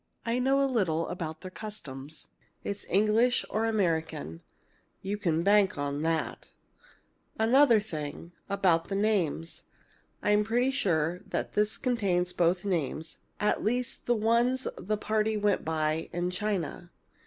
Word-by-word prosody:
I 235 +1 0
know 270 +2 +3
a 275 - +4
little 185 -11 0
about 160 -3 -5
their 185 - -8
customs. 155 -10 -8 0.3
It's 200 0 -5
English 215 +5 +3
or 220 +1 +1
American. 160 - -1 0.6
You 195 +2 -1
can 170 -5 0
bank 200 -2 +4
on 145 0 -2
that! 160 0 -2 0.8
"Another 235 +1 +5
thing 165 -4 -6 0.2
about 185 -4 +2
the 195 - -1
names. 195 -6 0 0.6
I'm 210 0 +3
pretty 240 +4 +1
sure 175 - 0
that - - -3
this 210 +1 +2
contains 190 -8 0
both 175 +2 +1
names 160 -3 -2 0.2
at 210 - +1
least 245 +3 -2
the 240 - +3
ones 235 +4 +2
the 210 +3 -2
parties 215 +1 0
went 205 -1 +2
by 155 0 -1
in 175 +1 -1
China. 180 -3 -3
195 Hz, 135 wpm, -29 LUFS, 165-220 Hz, 0.8 s, Another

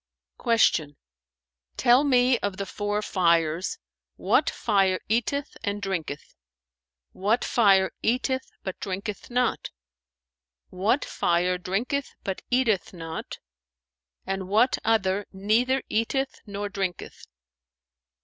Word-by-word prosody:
[FN#442]" 230 -2 +4
Q 145 -2 -3 0.8
"Tell 245 +3 +5
me 250 -3 +4
of 200 -2 -3
the 200 - -3
four 205 +2 -2
fires, 170 -3 +1 0.4
what - - +2
fire 195 -4 +1
eateth 240 +6 -1
and 205 -1 -2
drinketh; 170 -7 -4 0.8
what 210 +5 0
fire 195 -5 +4
eateth 260 +3 0
but 190 - -5
drinketh 200 +1 -5
not; 250 0 0 1.0
what 210 +9 +1
fire 180 +1 +1
drinketh 240 +10 -2
but 190 -1 -3
eateth 240 -8 +1
not 165 -1 -6 0.9
and 195 -1 -3
what 220 +6 +3
other 205 -3 +1
neither 230 +7 +1
eateth 265 +5 -1
nor 205 0 -4
drinketh?" 190 -3 -5
205 Hz, 105 wpm, -26 LUFS, 190-240 Hz, 1.0 s, Tell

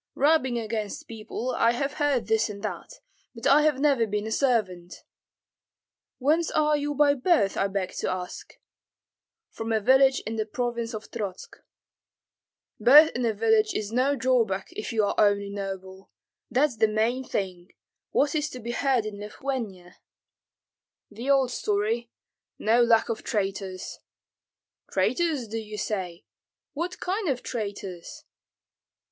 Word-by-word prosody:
"Rubbing 275 -4 +3
against 220 -2 -4
people, 230 +3 -5
I 230 - +3
have 275 +3 -2
heard 285 -5 +2
this 220 0 +1
and 200 0 -8
that, - - -6 0.3
but 230 - -8
I 280 +2 +6
have 300 -3 +2
never 275 -6 +3
been 210 0 -2
a 220 - -4
servant." 205 -9 -1 1.1
"Whence 310 +5 +2
are 300 0 +2
you 290 0 -2
by 290 0 +5
birth, 260 - +2
I 195 - +1
beg 195 -2 -3
to - - -1
ask?" 180 -1 -6 1.0
"From 225 0 -5
a 220 - +2
village 265 +4 +5
in 225 +1 -5
the 215 - 0
province 235 0 -3
of 215 - -9
Trotsk." 200 -5 -6 1.2
"Birth 300 +5 +8
in 245 - -3
a 225 - +1
village 220 0 +2
is 210 0 -3
no 260 +4 +2
drawback, 240 -7 +1
if 410 -3 -5
you 220 -2 +2
are - - 0
only 200 -1 +3
noble; 190 -1 -7 0.4
that's 255 0 +1
the 220 0 +4
main 225 +4 0
thing. 185 -6 -4 0.4
What 285 - +1
is 305 -1 0
to 255 - -8
be 235 0 -5
heard 255 -2 +1
in 210 -1 -6
Lithuania?" 210 -5 -5 1.1
"The 235 +6 -6
old 270 -3 +3
story, 220 +2 -1 0.5
no 230 +3 +3
lack 230 -1 +4
of 230 - -2
traitors." 195 -2 -3 0.9
"Traitors, 315 -9 0
do 225 +1 -4
you 215 -1 -8
say? 185 -5 -4 0.5
What 350 +5 -4
kind 385 0 -2
of 255 -3 -2
traitors?" 200 -6 -6
230 Hz, 145 wpm, -26 LUFS, 205-270 Hz, 1.2 s, Birth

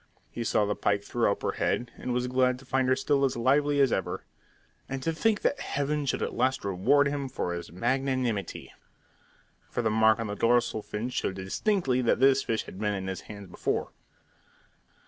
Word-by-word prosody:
He 120 - -4
saw 110 -2 +2
the 105 - 0
pike 100 0 0
throw 115 0 +1
up - - -4
her - - +1
head, 120 -1 -1
and 125 - -5
was 125 0 0
glad 125 0 +2
to 135 - -15
find 130 0 +1
her 130 - +4
still 140 +1 +1
as 135 -3 +1
lively 145 +4 +2
as 135 -3 +4
ever. 95 - -2 0.7
And 135 -1 -4
to 165 - 0
think 215 +5 +1
that - - +1
Heaven 145 +1 -2
should - - 0
at - - -3
last 130 -3 0
reward 120 +10 +3
him 140 -1 -3
for 90 -8 -3
his 85 0 -6
magnanimity! 125 -1 -1 1.0
For 120 - -2
the 110 - +1
mark 110 0 +4
on 115 - -2
the 105 - -3
dorsal 115 0 +2
fin 105 +4 -4
showed 95 - -2
distinctly 130 - 0
that 120 - +2
this 135 +1 +5
fish 115 -4 -1
had 95 - -10
been 105 -1 0
in 95 -1 -4
his 95 0 -4
hands 100 -2 -10
before. 90 - -2
125 Hz, 200 wpm, -28 LUFS, 105-135 Hz, 1.0 s, this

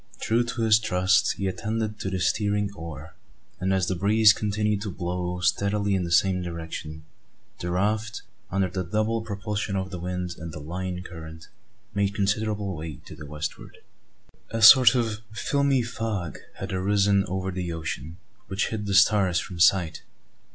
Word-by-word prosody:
True 115 +2 +1
to 120 0 -3
his 110 -1 +5
trust, 95 -3 +2
he 100 - -4
attended 110 +3 -2
to 95 - -3
the 95 - -2
steering 105 +1 0
oar: 80 -4 -9 0.5
and 95 +1 0
as 95 -2 +2
the 95 - -1
breeze 105 +3 +5
continued 105 0 -1
to 105 - -4
blow 90 0 -3
steadily 100 +2 +1
in 95 -2 0
the 85 - -5
same 90 +1 +3
direction, 80 -2 -6 0.6
the 90 - -4
raft, 105 +5 -1 0.3
under 95 0 +1
the 95 +1 -3
double 110 +5 0
propulsion 105 -1 -3
of 95 -1 -2
the 90 - -5
wind 90 0 -4
and 80 +1 -6
the - - -7
"line 90 +4 -5
current," 80 -2 -10 0.4
made 100 -1 0
considerable 100 -1 -1
way 80 -1 -6
to - - -10
the 75 - -10
westward. 75 +1 -6 0.7
A 115 0 -2
sort 125 +1 +9
of 115 -3 0
filmy 140 +2 +1
fog 110 - -4 0.2
had - - -6
arisen 100 +1 +2
over 95 +1 -2
the 90 -1 -4
ocean, 80 -1 -5 0.3
which 95 0 -1
hid 105 -2 -4
the 100 - 0
stars 100 -3 +4
from 85 0 -4
sight. 85 -2 +3
95 Hz, 165 wpm, -26 LUFS, 90-105 Hz, 0.7 s, sort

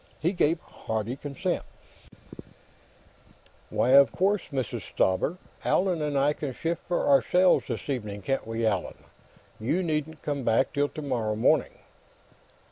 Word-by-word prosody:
He 170 +3 +1
gave 170 -3 +1
hearty 110 +2 -4
assent: 175 +6 -2 2.1
"Why, - - +1
of 140 +1 +7
course, 195 +1 +1
Mrs. 130 -5 -3
Stauber. 95 - 0 0.3
Allan 180 -3 +1
and 150 -2 -1
I 140 +2 +3
can 140 -4 -5
shift 165 0 -2
for 175 - 0
ourselves, 180 +6 +4
this - - -5
evening; 105 -7 -4
can't 135 -1 -1
we, 115 0 -1
Allan? 100 -4 -1 0.6
You 150 +12 0
needn't 155 -1 -3
come 145 -3 -2
back 115 +5 +2
till 145 -1 +1
tomorrow 125 -8 -2
morning." 110 - +2
140 Hz, 130 wpm, -27 LUFS, 115-165 Hz, 2.1 s, of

